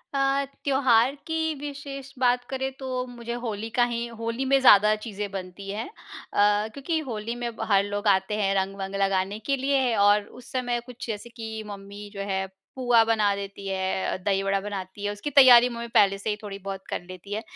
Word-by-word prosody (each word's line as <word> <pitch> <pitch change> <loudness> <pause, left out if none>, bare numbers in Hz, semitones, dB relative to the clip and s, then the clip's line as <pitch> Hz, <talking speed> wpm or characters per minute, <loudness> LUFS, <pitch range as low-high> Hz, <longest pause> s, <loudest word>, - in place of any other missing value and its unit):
अ, 275 0 +2 0.2
त्योहार 265 -2 +3
की 320 0 0
विशेष 275 -1 -7
बात 245 -1 +3
करें 265 0 -2
तो 265 - -6 0.2
मुझे 235 -1 -6
होली 220 0 -3
का 245 - +6
ही 235 0 -2
होली 230 +3 -2
में 270 +1 +4
ज़्यादा 210 -4 +7
चीज़ें 205 -2 -4
बनती 195 0 -7
हैं। 210 - -3
अ, 210 - 0
क्योंकि 320 +4 -2
होली 230 0 -4
में 240 -1 -4
ब - - -4
हर 200 0 +5
लोग 205 +1 -3
आते 190 +1 +3
हैं, 195 -1 +2
रंग-वंग 195 0 -2
लगाने 195 +1 0
के 275 - +2
लिए 265 -3 +1
और 205 0 +5 0.2
उस - - -15
समय 245 -2 -1
कुछ 250 -1 -9
जैसे 220 +1 -5
कि 220 -2 -6
मम्मी 200 0 -9
जो 200 - -5
है, 190 0 0 0.3
पुआ 245 -3 +4
बना 215 -3 +2
देती 200 0 -7
है, 190 0 -1
दही 195 0 +1
बड़ा 195 0 +1
बनाती 195 -1 -6
है, 205 - 0
उसकी 205 +7 -5
तैयारी 250 -3 +8
मम्मी 235 -1 -5
पहले 195 -1 +5
से 200 - -4
ही 210 - 0
थोड़ी-बहुत 195 -1 -6
कर - - -2
लेती 185 +2 -8
है। 215 - -2
215 Hz, 195 wpm, -26 LUFS, 200-250 Hz, 0.3 s, तैयारी